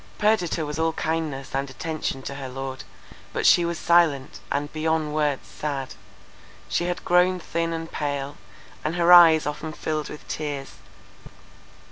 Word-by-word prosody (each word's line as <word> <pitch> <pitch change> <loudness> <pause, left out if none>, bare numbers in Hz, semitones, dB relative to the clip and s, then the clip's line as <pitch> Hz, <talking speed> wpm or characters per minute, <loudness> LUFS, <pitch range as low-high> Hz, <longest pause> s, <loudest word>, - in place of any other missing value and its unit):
Perdita 210 -7 +1
was 150 +1 -5
all 165 0 +1
kindness 155 -5 -3
and 135 +1 -1
attention 150 -1 -4
to 140 - -5
her 135 -1 -6
lord; 135 0 -6 0.5
but - - -1
she 175 - +6
was 170 0 -2
silent, 160 -7 +2
and 145 +1 -2
beyond 155 -1 0
words 150 -3 0
sad. 140 -3 -4 0.7
She 175 - 0
had 180 0 -3
grown 180 +1 +4
thin 165 0 -2
and 165 0 -5
pale; 145 -1 -3 0.5
and 155 +3 -1
her 175 0 +5
eyes 165 -3 +8
often 150 +1 -4
filled 155 0 -3
with 150 - -10
tears. 145 -3 -4
155 Hz, 150 wpm, -24 LUFS, 140-165 Hz, 0.7 s, eyes